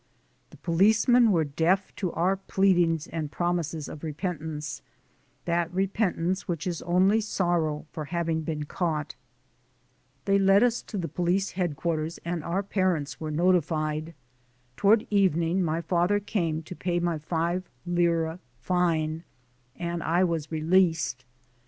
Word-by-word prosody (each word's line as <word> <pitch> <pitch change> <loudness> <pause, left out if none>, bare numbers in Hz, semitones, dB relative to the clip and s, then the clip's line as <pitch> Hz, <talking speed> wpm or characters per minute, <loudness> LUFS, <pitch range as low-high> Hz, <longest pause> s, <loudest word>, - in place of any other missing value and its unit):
The - - -15
policemen 220 +7 +4
were 165 -4 +3
deaf 165 +6 0
to 180 -4 -2
our 180 +4 +2
pleadings 180 -5 +2
and 155 -3 -5
promises 170 -3 -2
of 150 - -9
repentance 155 -2 -4 0.6
that 170 0 0
repentance 190 -1 0
which 165 -4 -3
is 175 -3 -3
only 190 +5 +3
sorrow 175 -7 0
for 155 - -5
having 165 0 -1
been 155 -1 -3
caught. 155 -2 -2 1.1
They 200 0 +3
led 195 +2 +5
us 245 -1 +2
to 210 - -7
police 180 +5 0
headquarters 165 -2 -2
and 170 -2 -2
our 180 +5 -1
parents 185 -8 -1
were 155 - -4
notified. 160 -1 0 0.6
Toward 210 +2 +4
evening 185 -3 +2
my 165 -1 0
father 175 +4 +1
came 170 -6 -2
to 180 - -9
pay 175 -1 -1
my 170 -2 -1
five 170 +3 -2 0.2
lire 170 -1 +1 0.2
fine, 165 0 0 0.5
and 170 0 -3
I 170 +3 +2
was 165 -4 -1
re 160 -1 -2
leased. 160 -7 +2
170 Hz, 135 wpm, -27 LUFS, 160-185 Hz, 1.1 s, led